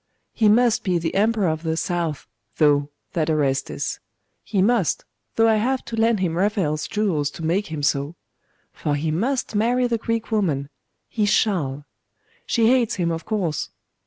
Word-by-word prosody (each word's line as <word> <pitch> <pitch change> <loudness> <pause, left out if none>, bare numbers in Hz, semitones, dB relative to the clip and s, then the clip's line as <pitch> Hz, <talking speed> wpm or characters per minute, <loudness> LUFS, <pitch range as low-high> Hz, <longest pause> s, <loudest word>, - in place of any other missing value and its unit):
He 220 -2 +3
must 235 +1 +3
be 185 -3 +1
the 165 -1 -2
Emperor 210 -1 +2
of 160 -1 -1
the 160 -1 -2
South, 170 -3 -2 0.3
though, 145 -2 +3 0.2
that 160 -2 0
Orestes; 140 -4 -1 0.4
he 205 - -2
must, 205 -2 +2 0.3
though 225 0 +4
I 220 -1 +4
have 255 +4 0
to 230 - -5
lend 225 -2 +2
him 170 -3 0
Raphael's 180 -6 0
jewels 185 -10 0
to 160 - -7
make 190 +6 0
him 155 -2 -5
so. 140 +3 0 0.6
For 145 - -2
he 155 +2 -1
must 240 - -1
marry 240 +4 +2
the 235 -2 0
Greek 230 +1 -2
woman. 155 -11 0 0.4
He 210 -2 0
shall. 155 -10 +1 0.6
She 230 -2 +3
hates 250 -4 +2
him, 170 -3 0
of 165 0 -4
course.... 185 -9 -2
185 Hz, 165 wpm, -23 LUFS, 155-225 Hz, 0.6 s, though